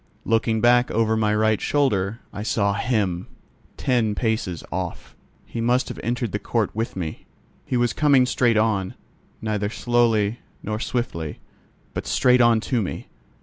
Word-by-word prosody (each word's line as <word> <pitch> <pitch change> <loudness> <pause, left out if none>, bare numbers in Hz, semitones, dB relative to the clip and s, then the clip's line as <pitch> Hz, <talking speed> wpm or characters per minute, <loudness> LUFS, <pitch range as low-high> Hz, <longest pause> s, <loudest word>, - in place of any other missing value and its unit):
Looking 115 -1 +1
back 120 +1 +4
over 110 0 +1
my 105 -1 +1
right 110 0 +2
shoulder, 115 -7 0
I 100 - -5
saw 100 -2 +1
him, 100 -6 -1 0.5
ten 115 -5 +1
paces 110 -8 -1
off. - - -5 0.3
He 115 - -5
must 125 +2 +1
have - - -7
entered 120 -1 -2
the 105 - -2
court 105 0 -1
with 115 +2 -2
me. 85 -4 -5 0.4
He 125 - 0
was 120 0 +1
coming 140 -4 +4
straight 120 -2 +2
on, 105 -4 +1 0.5
neither 105 -2 -1
slowly, 115 -2 +1 0.2
nor 110 0 -3
swiftly, 85 -12 -3 0.5
but - - -4
straight 125 -1 +4
on 120 -1 +5
to 120 0 0
me. 95 - -5
110 Hz, 150 wpm, -23 LUFS, 105-120 Hz, 0.5 s, on